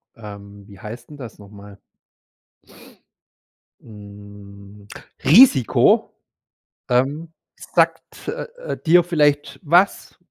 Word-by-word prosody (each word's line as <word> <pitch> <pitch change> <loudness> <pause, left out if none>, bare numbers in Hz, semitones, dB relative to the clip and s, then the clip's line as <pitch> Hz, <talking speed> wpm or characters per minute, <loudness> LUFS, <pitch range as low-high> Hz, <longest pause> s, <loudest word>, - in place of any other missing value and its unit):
Ähm, 100 -2 -13
wie 100 -2 -16
heißt 115 +2 -10
'n 150 - -12
das 125 -7 -11
noch 100 -1 -15
mal? 100 -1 -15 2.0
Hm, 100 -1 -15 0.4
„Risiko“! 160 - +4 0.8
Ähm, 140 +6 -1 0.2
sagt, - - -2
äh, - - -5 0.3
äh, - - -4
dir 175 +2 +4
vielleicht 150 -4 0
was? 175 +5 +1
110 Hz, 95 wpm, -20 LUFS, 100-150 Hz, 2.0 s, Risiko